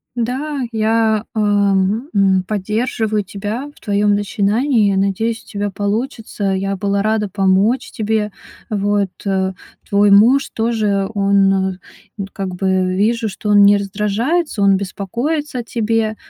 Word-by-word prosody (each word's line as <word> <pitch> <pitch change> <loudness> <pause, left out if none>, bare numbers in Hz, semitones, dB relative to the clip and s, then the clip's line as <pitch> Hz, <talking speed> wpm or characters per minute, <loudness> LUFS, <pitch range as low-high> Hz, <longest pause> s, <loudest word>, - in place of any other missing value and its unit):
Да, 265 +5 -2
я, 220 -1 +1
эм, 205 +3 +1
м, 190 -2 +3
поддерживаю 215 +1 -1
тебя 205 +8 -5
в - - -20
твоем 205 -1 +1
начинании. 210 +3 +1
Я 195 - 0
надеюсь, 220 +4 -1
у - - -27
тебя 205 -1 -3
получится. 215 +1 -3
Я 195 +1 0
была 200 +1 -1
рада 215 -1 0
помочь 195 +6 +1
тебе, 215 -1 -1 0.4
вот, 205 -2 0 0.2
э. 190 -1 0 0.3
Твой 205 0 +3
муж 240 +7 +5
тоже, 215 -4 0
он, 200 -1 +3 0.2
э, - - -13 0.4
вот, 195 -1 -6
как 190 -2 -5
бы, 185 -1 0
вижу, 225 +3 +1
что 205 +2 -5
он 205 -1 +6
не 205 0 +6
раздражается, 210 - -1
он 195 -1 +4
беспокоится 245 - -3
о - - -4
тебе. 225 -1 -1
205 Hz, 140 wpm, -18 LUFS, 195-225 Hz, 0.4 s, он